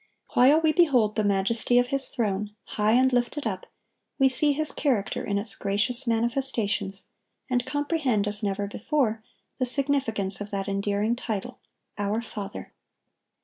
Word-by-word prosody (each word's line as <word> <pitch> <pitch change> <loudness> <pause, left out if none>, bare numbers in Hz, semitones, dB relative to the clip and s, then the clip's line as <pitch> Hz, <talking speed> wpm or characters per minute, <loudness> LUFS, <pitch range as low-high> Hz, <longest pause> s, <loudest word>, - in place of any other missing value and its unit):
While 280 +6 +5
we 315 -1 +3
behold 260 -11 +2
the 215 - 0
majesty 205 +4 +1
of 245 0 +2
His 275 0 +5
throne, 210 -3 -3
high 210 +1 0
and 260 +1 +3
lifted 245 +4 -1
up, 190 -4 -4 0.5
we 270 -1 +4
see 290 +3 +3
His 310 +2 0
character 250 -9 -1
in 200 - -2
its 210 +2 +2
gracious 235 +6 +2
manifestations, 225 -4 0 0.5
and 245 -1 0
comprehend, 290 -8 -1
as 205 0 -1
never 200 -1 -2
before, 225 +1 -1 0.4
the 255 - +1
significance 245 -8 0
of 205 - -6
that 200 -1 -4
endearing 200 +3 -1
title, 220 -5 -5 0.4
"Our 205 +3 -1
Father." 205 -2 -8
225 Hz, 145 wpm, -25 LUFS, 205-260 Hz, 0.5 s, While